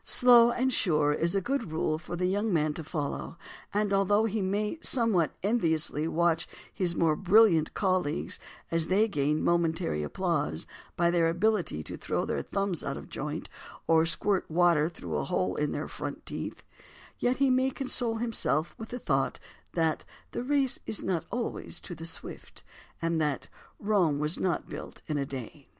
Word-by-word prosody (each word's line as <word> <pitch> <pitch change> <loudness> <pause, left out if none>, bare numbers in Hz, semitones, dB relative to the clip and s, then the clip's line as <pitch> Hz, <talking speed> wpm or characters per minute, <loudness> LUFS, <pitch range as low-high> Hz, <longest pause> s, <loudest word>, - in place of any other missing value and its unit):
"Slow 240 -1 +7
and 255 +2 0
sure" 150 -8 +2
is 170 +4 0
a 195 - +2
good 270 - -1
rule 155 0 0
for 175 +2 -6
the 180 +1 -1
young 205 +4 0
man 155 -3 +2
to 160 - -6
follow, 155 +1 -4 0.3
and 205 0 0
although 205 +2 +3
he 220 -1 -1
may 210 +9 -1
somewhat 225 - +2
enviously 160 -7 +1
watch 165 0 +1 0.3
his 175 -3 0
more 160 -2 +3
brilliant 190 -4 +4
colleagues 185 -5 0 0.3
as 165 -1 +1
they 205 +4 +3
gain 150 -5 0
momentary 165 - +1
applause 75 +1 -1 0.3
by 170 0 +3
their 170 -1 +3
ability 175 - 0
to - - -7
throw - - -1
their - - -1
thumbs 195 -4 -2
out 140 - -3
of - - -10
joint 150 +2 -4 0.4
or 165 0 +4
squirt 195 +3 0
water 165 -2 +3
through - - -5
a - - -1
hole - - 0
in - - 0
their - - -3
front - - -6
teeth, - - -6 0.6
yet 245 +1 +1
he 275 -1 +3
may 260 +1 +3
console 250 -3 -1
himself 220 -9 0
with 225 - -7
the 245 - -4
thought - - 0 0.4
that 160 -2 +1 0.3
"the - - -3
race 270 0 +1
is 215 - -1
not 180 -4 -1
always 240 -1 -4
to 180 - -8
the 165 0 -6
swift" - - -7 0.4
and 165 -1 +1
that 150 -3 -1 0.3
"Rome 195 -8 +2
was 150 +4 -1
not 180 -3 -1
built - - -8
in 150 -2 -2
a 140 - -2
day." 135 +2 -8
175 Hz, 175 wpm, -29 LUFS, 155-215 Hz, 0.6 s, Slow